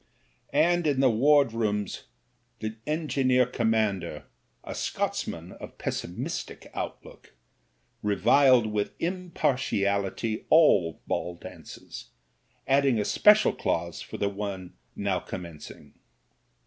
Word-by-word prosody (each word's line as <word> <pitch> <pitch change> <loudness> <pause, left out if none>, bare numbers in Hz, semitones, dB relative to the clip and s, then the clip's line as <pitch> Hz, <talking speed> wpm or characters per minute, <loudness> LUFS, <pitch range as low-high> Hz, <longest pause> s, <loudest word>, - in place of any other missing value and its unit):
And 175 -1 +3
in 140 -3 +1
the 135 -2 +5
wardroom 115 -5 +3 0.7
the 110 0 -5
engineer 135 -5 +2
commander 110 -9 -1 0.2
— - - -44
a - - -6
Scotsman - - -3
of - - -11
pessimistic 85 - -5
outlook - - -8 0.3
— - - -43
^reviled 120 +5 +4
with 105 -1 -2
impartiality 115 - -1
all 100 - +5
ball 90 0 -2
dances, 85 - -10 0.6
adding 135 -2 +3
a 105 - 0
special 210 +1 +5
clause 85 -1 -2
for - - -8
the 100 - 0
one 100 -2 -5 0.2
now 100 -2 -1
commencing. 85 -4 -9
110 Hz, 105 wpm, -27 LUFS, 100-140 Hz, 0.7 s, the